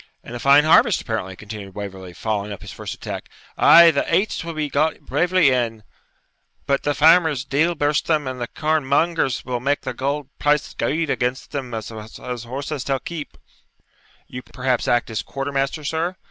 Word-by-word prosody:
'And 120 - -8
a - - -5
fine 140 +3 +6
harvest, 155 - +5
apparently,' 100 -5 -4
continued 100 -1 -9
Waverley, 95 -3 -7
following 105 +1 -3
up 100 - -8
his - - -9
first - - -6
attack. - - -7 0.3
'Ay, 170 0 +8
the 140 - 0
aits 200 -2 +1
will 165 -1 -6
be 155 -1 -1
got 150 +3 0
bravely 175 -5 +2
in; 115 -4 -1 0.8
but 140 -1 +1
the 145 -1 -1
farmers, 160 -3 +4
deil 155 +6 +1
burst 145 -1 0
them, 155 -3 +1
and 130 -1 -5
the 120 - -2
corn 155 +2 0
mongers 140 -1 +1
will 125 -1 -2
make 140 +4 0
the - - -4
auld 140 0 -1
price 150 0 +1
gude 160 0 -1
against 125 +1 -2
them 135 -4 -4
as 110 - -5
has 115 +2 -7
horses 140 +3 -4
till 135 -1 -1
keep.' 160 0 -7 0.9
'You 125 - -7
perhaps 125 -1 -2
act 120 -1 +1
as 110 - -2
quartermaster, 140 +2 -3
sir?' 165 +5 -2
140 Hz, 180 wpm, -21 LUFS, 120-155 Hz, 0.9 s, Ay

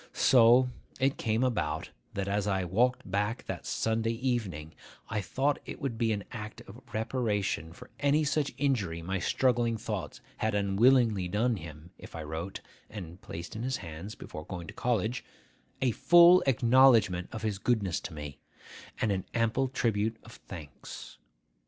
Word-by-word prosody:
So 125 +1 +5 0.3
it 135 +1 +2
came 115 +1 0
about, 85 - -1 0.2
that, 100 -1 -2
as 100 0 0
I 95 -2 +1
walked 110 +3 +1
back 105 +4 -1
that - - -5
Sunday 115 +1 0
evening, 110 - -2 0.4
I 105 0 -1
thought 135 +7 0
it - - -8
would 120 -5 -3
be 115 -1 +2
an 105 -2 -2
act 105 -1 -7
of 110 +6 -13
reparation 105 - -1
for 85 - -13
any 145 +2 +3
such 150 -1 0
injury 105 -13 0
my 95 +2 -2
struggling 120 +3 +1
thoughts - - -5 0.2
had 110 -1 0
unwillingly 105 0 +3
done 110 +5 +1
him, 80 0 -10
if - - -11
I 80 - -5
wrote, 80 +5 -5 0.3
and 90 -4 -9
placed 85 +4 -7
in 110 - -4
his 130 +1 -1
hands, 85 +6 -7
before 75 - -8
going 90 -2 -6
to - - -8
college, 120 0 -1 0.6
a 125 - +3
full 175 +8 +7
acknowledgment 115 -7 +4
of 110 - -6
his 105 -3 -1
goodness 100 -7 +1
to 90 - -8
me, 75 -2 -7 0.6
and 110 - +1
an 95 -2 -1
ample 115 +3 +2
tribute 110 -3 0
of 115 - -13
thanks. 75 -8 -10
110 Hz, 160 wpm, -30 LUFS, 95-125 Hz, 0.6 s, full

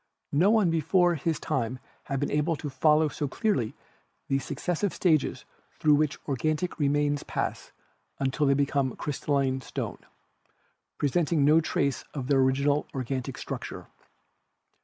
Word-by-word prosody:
No 170 +8 +4
one 215 -6 +4
before 175 +2 +3
his 160 +1 -1
day 125 -1 -2 0.3
had 140 -2 -2
been 145 - -1
able 150 +3 +1
to 145 -1 -6
follow 155 +3 +4
so 145 0 -3
clearly 135 - -1 0.5
the 135 - +2
successive 175 +7 -2
stages 160 -6 +1 0.3
through 150 - +3
which 145 -1 +2
organic 155 +6 -1
re 145 -2 +3
mains 145 0 +1
pass - - -4 0.5
until 140 +2 0
they 140 - +4
become 140 -2 0
crystalline 140 -2 -1
stone, - - -5 1.0
presenting 150 0 +2
no 155 +2 +6
trace 140 -4 -1
of 135 -3 -3
their 140 -2 +4
original 140 +3 +2
organic 130 0 -3
structure. - - -6
145 Hz, 135 wpm, -27 LUFS, 135-160 Hz, 1.0 s, no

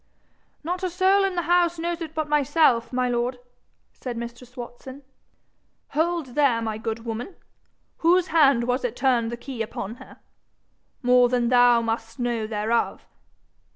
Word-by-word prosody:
'Not 355 +4 -3
a 370 - -1
soul 380 +3 +3
in 385 -2 0
the 345 - -1
house 345 +1 +2
knows 340 +1 -3
it 320 -1 -6
but 310 -1 -1
myself, 295 -4 +2
my 255 0 0
lord,' 245 +1 -1 0.6
said 245 -3 -6
mistress 240 +1 -8
Watson. 255 +3 -9 0.9
'Hold 320 -3 -1
there, 275 -5 +3
my 220 -1 -3
good 225 0 -4
woman! 235 - -5 0.6
Whose 355 +2 +3
hand 275 -7 +4
was 250 +2 -1
it 245 -1 -2
turned 245 -3 +1
the 235 - -5
key 255 -1 -7
upon 220 0 -5
her? - - -14 0.9
More 250 0 +5
than 240 -1 +1
thou 245 -1 +5
must 225 0 -3
know 235 -3 -2
thereof. 220 +2 -1
250 Hz, 155 wpm, -24 LUFS, 235-320 Hz, 0.9 s, More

